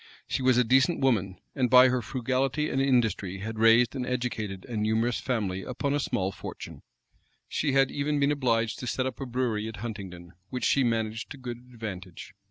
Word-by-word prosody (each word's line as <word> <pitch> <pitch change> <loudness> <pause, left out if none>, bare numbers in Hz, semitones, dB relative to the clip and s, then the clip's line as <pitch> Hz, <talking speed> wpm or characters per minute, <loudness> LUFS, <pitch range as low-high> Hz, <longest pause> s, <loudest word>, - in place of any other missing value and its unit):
She - - -1
was 130 -1 +4
a 125 - +5
decent 130 +7 +3
woman; 100 -8 +1 0.2
and 125 -2 +1
by 130 +1 +8
her 125 -1 0
frugality 130 +5 -1
and 135 - +1
industry 115 -8 +1
had 110 +3 -6
raised 115 +3 +5
and 130 - -2
educated 120 -6 -3
a 120 - -6
numerous 110 +2 +1
family 100 -7 -2
upon 130 +5 -2
a 145 - +1
small 95 -8 -1
fortune. - - -9 0.7
She 145 -3 -1
had 135 -1 +3
even 145 +1 -1
been 140 +1 +3
obliged 115 -5 0
to 125 - -5
set 130 +3 -1
up 130 - -5
a 135 - -3
brewery 120 -4 -1
at 110 -1 -7
Huntingdon, 95 -6 -7 0.2
which 125 - -3
she 140 - +3
managed 115 -1 -1
to 145 - -8
good 125 -2 -6
advantage. 100 -5 -8
120 Hz, 190 wpm, -28 LUFS, 110-130 Hz, 0.7 s, by